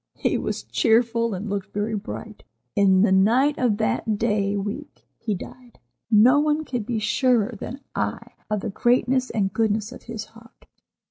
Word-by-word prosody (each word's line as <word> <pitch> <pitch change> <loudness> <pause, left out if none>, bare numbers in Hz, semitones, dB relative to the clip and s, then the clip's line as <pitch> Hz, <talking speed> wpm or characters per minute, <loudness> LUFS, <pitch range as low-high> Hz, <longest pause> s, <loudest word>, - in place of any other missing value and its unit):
He - - 0
was - - -3
cheerful, 230 -1 +2
and 195 +4 -5
looked 200 -1 -4
very 210 +2 -2
bright. 210 +1 -7 0.3
In 190 -1 +4
the 215 - +3
night 240 +10 +3
of 235 -5 +2
that 220 -1 0
day 205 -2 0
week 210 +9 -6
he 215 -3 -2
died. 245 +5 -11 0.3
No 235 +6 +6
one 300 +1 +1
can 245 -4 -3
be 225 +2 -3
surer 240 0 +1
than 265 +4 -7
I - - -3 0.2
of 210 -2 -1
the 215 - -4
greatness 250 +3 +2
and 195 -3 -1
goodness 220 0 0
of - - -10
his 225 -2 -6
heart. 230 +1 -19
225 Hz, 170 wpm, -24 LUFS, 205-245 Hz, 0.3 s, No